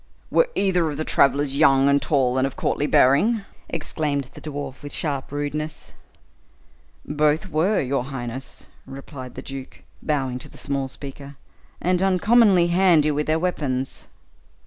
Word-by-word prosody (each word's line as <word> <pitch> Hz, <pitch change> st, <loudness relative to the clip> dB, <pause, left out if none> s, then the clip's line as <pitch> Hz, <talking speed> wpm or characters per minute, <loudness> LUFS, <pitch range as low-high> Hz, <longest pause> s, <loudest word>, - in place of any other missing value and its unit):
"Were -, -, +3 dB
either 180 Hz, -4 st, +2 dB
of 145 Hz, -, -5 dB
the 155 Hz, -, -3 dB
travelers 140 Hz, 0 st, +2 dB
young, 140 Hz, -2 st, +5 dB
and 140 Hz, 0 st, +3 dB
tall, 130 Hz, -3 st, +1 dB
and 130 Hz, -, +2 dB
of 135 Hz, -, -8 dB
courtly 145 Hz, -, -1 dB
bearing?" 195 Hz, -, +4 dB, 0.3 s
exclaimed 145 Hz, -4 st, -2 dB
the -, -, -12 dB
dwarf 145 Hz, -3 st, -6 dB
with 145 Hz, -1 st, -8 dB
sharp 140 Hz, -4 st, -2 dB
rudeness. 145 Hz, +2 st, -4 dB, 1.1 s
"Both 150 Hz, +4 st, 0 dB
were, 180 Hz, +7 st, +2 dB
your 130 Hz, -1 st, -1 dB
highness," 130 Hz, -1 st, -6 dB, 0.2 s
replied 135 Hz, -1 st, -9 dB
the 130 Hz, -, -7 dB
duke, 135 Hz, -1 st, -9 dB, 0.2 s
bowing 135 Hz, -5 st, -1 dB
to -, -, -10 dB
the -, -, -15 dB
small 140 Hz, -1 st, -2 dB
speaker, 140 Hz, +1 st, -9 dB, 0.4 s
"and 180 Hz, +1 st, +1 dB
uncommonly 195 Hz, -1 st, +4 dB
handy 170 Hz, -4 st, +4 dB
with 150 Hz, +1 st, -1 dB
their 155 Hz, +1 st, +2 dB
weapons." 140 Hz, -7 st, -2 dB
145 Hz, 145 wpm, -23 LUFS, 135-160 Hz, 1.1 s, young